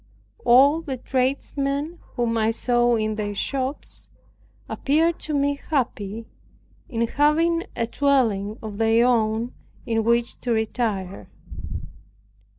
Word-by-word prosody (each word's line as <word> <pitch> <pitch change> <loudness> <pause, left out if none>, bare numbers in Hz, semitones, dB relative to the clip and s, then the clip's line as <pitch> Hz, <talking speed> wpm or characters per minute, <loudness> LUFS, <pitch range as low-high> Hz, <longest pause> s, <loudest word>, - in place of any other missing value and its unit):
All 275 +6 +6
the 275 -5 -4
tradesmen, 275 +5 -1 0.2
whom 240 -2 0
I 220 -1 +2
saw 240 +1 +2
in 215 -1 -1
their 205 -1 -3
shops, 270 +5 -3 0.6
appeared 320 +4 +1
to 310 - -4
me 285 0 0
happy, 230 -7 -2 0.6
in 235 -2 0
having 325 +6 +2
a 230 - 0
dwelling 230 -6 +1
of 210 -1 -6
their 225 +1 +4
own 230 -1 +1 0.3
in 225 -1 0
which 235 +1 +1
to 245 - -2
retire. 220 -4 -2
240 Hz, 115 wpm, -24 LUFS, 225-280 Hz, 0.6 s, All